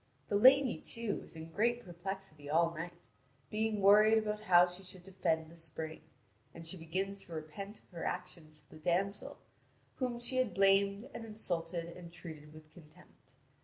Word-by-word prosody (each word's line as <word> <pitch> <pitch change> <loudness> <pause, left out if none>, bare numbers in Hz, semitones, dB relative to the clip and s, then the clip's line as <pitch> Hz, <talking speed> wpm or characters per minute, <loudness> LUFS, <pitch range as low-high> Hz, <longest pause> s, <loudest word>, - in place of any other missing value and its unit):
The - - +1
lady, 260 +4 +6
too, 230 -3 -2
is - - -11
in 160 0 -8
great 235 +5 +1
perplexity 175 -4 -6
all 165 +2 +3
night, 170 +1 -8 0.4
being 215 -1 0
worried 210 +3 +7
about 210 -1 0
how 180 -5 +6
she 180 +1 -5
should 185 -1 -9
defend 165 -4 -1
the - - -13
spring; 160 -1 -4 0.5
and 165 - -8
she 165 - -2
begins 190 +4 -3
to 170 - -12
repent 160 +7 -7
of - - -31
her 170 -3 -7
action 175 -3 -4
to 150 -1 -13
the 155 - -12
damsel, 190 +5 0 0.6
whom 250 -2 -1
she 240 +2 +1
had 245 -8 +1
blamed 200 +3 +4
and - - -6
insulted 175 -6 -3
and 170 0 -10
treated 160 -3 -8
with 155 0 -14
contempt. 155 -2 -19
180 Hz, 170 wpm, -34 LUFS, 165-205 Hz, 0.6 s, worried